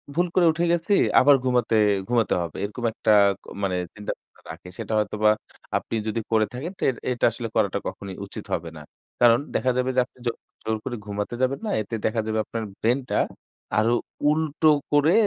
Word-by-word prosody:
"ভুল 175 +2 +2
করে 180 - +5
উঠে 170 +2 0
গেছি, 170 +4 +1 0.3
আবার 145 +2 +7
ঘুমাতে 125 -3 +2 0.3
ঘুমাতে 120 -2 +2
হবে।" 85 -3 -5
এরকম 105 +4 -5
একটা 110 - +1 0.5
মানে 95 -2 0 0.2
চিন্তাভাবনা 105 -1 -8
রাখে। 90 - -11
সেটা - - -4
হয়তোবা 105 0 +2 0.5
আপনি - - -4
যদি 110 +1 -1
করে 110 -1 +4
থাকেন 140 +8 -5
তো - - -18
এট 125 - -3
এটা 120 - +1
আসলে 115 +1 -5
করাটা 100 -3 +2
কখনই 100 -1 -6
উচিত - - -8
হবে 85 0 -2
না। - - -9 0.4
কারণ 120 -1 +7 0.2
দেখা 130 - +2
যাবে 130 0 +1
যে - - +4
আপনি 130 - -27
জোর 120 - 0 0.3
জোর 110 0 -1
করে 125 - -3
ঘুমাতে 105 +2 -3
যাবেন 130 +2 +1
না। - - -2
এতে 110 +2 -5
দেখা 110 +1 +1
যাবে 110 0 -1
আপনার 115 -1 -4 0.2
ব্রেইন 120 +4 +2
টা - - +1 0.6
আরো 115 +2 +3 0.4
উল্টো 155 0 +1 0.2
করে 145 +3 +4
115 Hz, 190 wpm, -24 LUFS, 110-130 Hz, 0.6 s, আবার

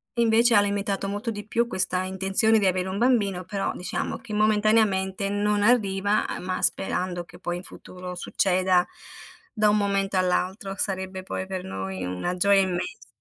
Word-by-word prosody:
e, 235 - +1
invece, 230 +1 +4
ha 205 - +7
limitato 200 -1 -1
molto 205 +4 -3
di 210 -1 -7
più 235 +2 +1
questa 185 -4 0
intenzione 190 +4 +2
di 200 - +1
avere 185 0 0
un 190 +1 -3
bambino, 205 -7 +1
però, 195 +2 -2
diciamo 180 - -4
che, 215 - -10
momentaneamente, 210 -2 +2
non 205 0 +1
arriva 205 -3 +2
a - - -4
ma 185 0 -3
sperando 180 -2 0
che, 175 - -15
poi, 175 -1 -3
in 180 - -9
futuro, 180 -1 -9
succeda 185 0 +1 0.7
da 215 -3 +3
un 210 - +3
momento 195 -1 0
all'altro. 190 +2 -1
Sarebbe, 190 -1 -2
poi, 190 0 -5
per 190 -1 -4
noi 95 0 -5
una 90 - -3
gioia 200 +2 +4
immensa, 185 - -3
195 Hz, 175 wpm, -25 LUFS, 185-210 Hz, 0.7 s, ha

